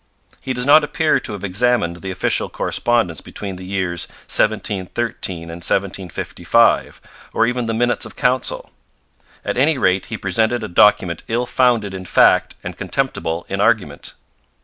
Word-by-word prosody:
He 130 - -4
does 125 0 -2
not 150 +2 +7
appear 155 +1 +1
to 110 - -5
have 100 - -7
examined 100 -2 +1
the 95 +2 -7
official 95 - -1
correspondence 115 -10 0
between 100 -3 -7
the 95 - -9
years 95 -2 -3 0.2
1713 105 -3 -1
and 85 - -10
1755, 95 -1 0 0.3
or 115 - +3
even 125 0 -1
the 115 - -1
Minutes 120 +1 0
of - - -14
Council. 125 0 -1 0.7
At - - -2
any 145 +3 +3
rate, 95 -5 +1
he 110 +1 -5
presented 110 +5 0
a - - -3
document 90 -2 +3
ill 120 +2 -1
founded 120 -6 +1
in 95 -1 -7
fact - - +3
and - - -6
contemptible 80 +1 -2
in - - -2
argument. - - 0
105 Hz, 150 wpm, -19 LUFS, 90-120 Hz, 0.7 s, not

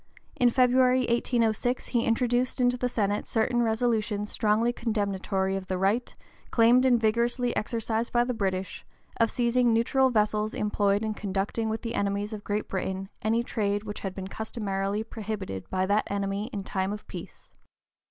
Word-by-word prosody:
In 245 - +4
February, 255 +1 +4
1806, 240 0 0
he 235 -2 +1
introduced 245 +2 +1
into 245 0 +3
the 250 0 -1
Senate 205 -3 -1
certain 240 +2 +1
resolutions 220 -2 0
strongly 220 +2 +2
condemnatory 200 -4 -1
of 190 -1 -5
the 185 - -1
right, 200 +6 0 0.3
claimed 245 +3 +5
and 245 -2 +4
vigorously 235 +2 +1
exercised 225 +1 -1
by 240 0 +3
the 250 +1 -2
British, 190 -4 -2
(p. - - -22 0.4
039) - - +6
of 225 - +1
seizing 240 0 +2
neutral 260 +4 +3
vessels 215 -2 +1
employed 205 0 +1
in 220 -1 -1
conducting 205 +2 -2
with 220 +1 -3
the 230 -1 -3
enemies 200 0 -1
of 210 -1 -6
Great 210 +1 -2
Britain 190 0 -3
any 225 +2 +1
trade 205 -3 -1
which 210 -1 -6
had 195 -2 -5
been 190 -1 -5
customarily 205 -1 -3
prohibited 210 - -6
by 185 0 0
that 205 +2 +1
enemy 200 +1 -2
in 200 -2 -4
time 190 0 -2
of 210 +1 -6
peace. - - -10
220 Hz, 170 wpm, -27 LUFS, 200-240 Hz, 0.4 s, 039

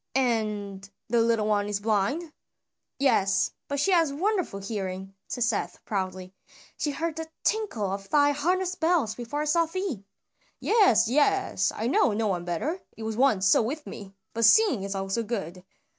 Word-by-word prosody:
And 210 -6 -1 0.2
the 235 0 +3
little 225 -2 +2
one 205 -1 +1
is 205 -1 -1
blind?" 225 - -1 0.6
"Yes, 195 -8 +2 0.2
but 285 0 -2
she 340 +8 +2
hath 330 -5 +3
wonderful 360 - -1
hearing," 195 -2 -5
said 245 - -2
Seth 225 -3 -1
proudly. 185 -2 -4 0.4
"She 300 - -2
heard 320 +2 -3
the 320 0 -5
tinkle 315 - -1
of 195 0 -5
thy 290 -1 +4
harness 360 +6 0
bells 320 - +1
before 250 +5 -4
I - - -1
saw 330 +2 +2
thee." 330 - -4 0.6
"Yes, 400 - +4
yes! 385 - +2
I 220 - -3
know, 245 -1 +3
no 220 +2 -1
one 180 -4 -1
better, 275 - -2 0.2
it 225 - -7
was 220 0 -3
once 220 -6 +3
so 195 - +5
with 290 +7 -4
me, 195 -2 -9 0.2
but 230 0 +2
seeing 300 - +5
is 195 0 -4
also 195 +3 -1
good. 195 -6 -5
230 Hz, 170 wpm, -27 LUFS, 200-305 Hz, 0.6 s, so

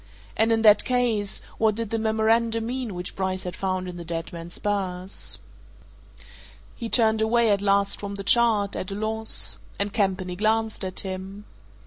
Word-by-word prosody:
And 225 +1 +3
in 225 0 +2
that 210 -1 +7
case, 235 -5 +1 0.2
what 220 -1 +3
did 230 -2 -4
the 225 - 0
memorandum 225 +1 +1
mean 245 -4 -4
which 180 0 -6
Bryce 190 -1 -2
had 180 -1 -5
found 185 -1 -2
in 180 -1 -7
the 170 - -7
dead 165 0 -5
man's 170 0 -8
purse? 190 -2 0 1.4
He 230 -2 -6
turned 220 -2 +4
away 230 0 +3
at 200 -1 +2
last 200 0 +2
from 200 0 -5
the 200 - -6
chart, 215 -2 +3
at 185 - -4
a 195 - -4
loss 220 +1 0 0.2
and 200 0 -2
Campany 190 -4 -1
glanced 220 +2 0
at 185 -1 -1
him. 190 +2 -7
205 Hz, 170 wpm, -25 LUFS, 190-225 Hz, 1.4 s, that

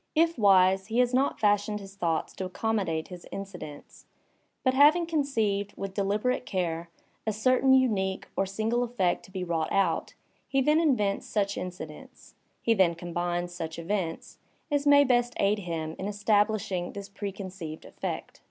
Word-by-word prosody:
If 330 +1 +3
wise, 190 -1 +5
he 225 +1 -2
has 250 0 +3
not 265 +2 +1
fashioned 210 0 +2
his 195 -1 -11
thoughts 170 -4 -1
to 190 - -3
accommodate 185 -5 -1
his 180 -2 -10
in 195 - -5
cidents; 155 -7 -11 0.6
but 260 - +3
having 300 +6 +6
conceived, 225 -11 -1
with 195 -1 -5
deliberate 210 +6 0
care, 170 -5 -2 0.4
a - - +3
certain 255 +5 +3
unique 210 -8 +2
or 195 - +1
single 225 +5 0
eflFect 190 -7 0
to - - -16
be 190 -1 -4
wrought 165 -2 -1
out, 190 -4 +1 0.3
he 270 - +1
then 300 +4 +4
invents 245 -11 +1
such 200 -2 0
incidents, 180 - -8 0.3
he 230 - +4
then 185 -5 +3
combines 175 +1 -3
such 160 -2 -5
events, 170 -1 -3 0.3
as 290 0 +1
may 285 0 +8
best 245 -2 +2
aid 205 +1 +2
him 165 -4 -4
in 190 - -3
establishing 205 -3 +1
this 200 -1 -7
preconceived 195 -5 -7
effect. - - -6
200 Hz, 160 wpm, -28 LUFS, 180-240 Hz, 0.6 s, may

